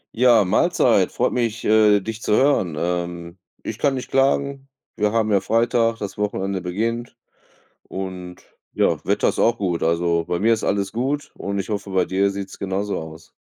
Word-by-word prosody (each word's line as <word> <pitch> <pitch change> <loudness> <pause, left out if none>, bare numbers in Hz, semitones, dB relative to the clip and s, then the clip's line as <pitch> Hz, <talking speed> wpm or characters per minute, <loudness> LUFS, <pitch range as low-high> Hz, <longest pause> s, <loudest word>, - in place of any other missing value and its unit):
Ja, 120 -3 +5
Mahlzeit, 90 - +2
freut - - 0
mich, 115 -2 -1
äh, 105 -1 +5
dich 110 +2 -6
zu - - +1
hören. 130 - +2
Ähm, 85 0 -3 0.2
ich 110 - -6
kann 140 +2 +1
nicht 130 -1 -5
klagen. 135 0 +1 0.3
Wir 105 0 +1
haben 110 -1 +1
ja 100 - +4
Freitag, 115 +2 +1
das 100 - -6
Wochenende 100 -2 -2
beginnt 115 +7 -3 0.7
und 90 -2 -7 0.3
ja, - - +1
Wetter - - +1
ist - - -2
auch 115 - +3
gut. 90 -4 -1
Also, 85 0 +1
bei 85 +1 -2
mir 115 +3 +3
ist 110 - 0
alles 100 -1 0
gut 135 +5 -2
und 100 0 -3
ich - - -6
hoffe, 100 -2 -4
bei 95 -1 +2
dir 95 +2 +1
sieht's 100 -1 -7
genauso 100 +1 -2
aus. 80 0 -11
100 Hz, 180 wpm, -22 LUFS, 90-115 Hz, 0.7 s, Ja